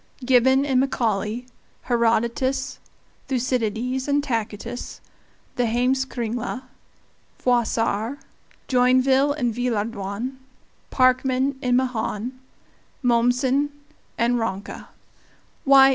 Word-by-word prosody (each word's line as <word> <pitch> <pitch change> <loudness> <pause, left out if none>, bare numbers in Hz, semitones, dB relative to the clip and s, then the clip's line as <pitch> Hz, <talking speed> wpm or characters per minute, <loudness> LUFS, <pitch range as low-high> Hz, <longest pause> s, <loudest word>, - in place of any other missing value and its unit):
Gibbon 260 +2 +4
and 265 -3 +2
Macaulay, 230 -3 0 0.4
Herodotus, 235 +3 0 0.5
Thucydides 250 0 -1
and 285 0 +2
Tacitus, 230 -1 -4 0.6
the 245 -1 +2
Heimskringla, 245 0 -1 0.7
Froissart, 235 0 0 0.5
Joinville 260 +2 +4
and 245 -5 0
Villehardouin, 230 0 -2 0.5
Parkman 260 +1 +2
and 250 -1 +2
Mahan, 245 -2 -1 0.7
Mommsen 250 +4 +2 0.5
and 240 +1 +2
Ranke 205 -3 -4 0.8
why! 270 -1 +8
245 Hz, 75 wpm, -23 LUFS, 230-260 Hz, 0.8 s, why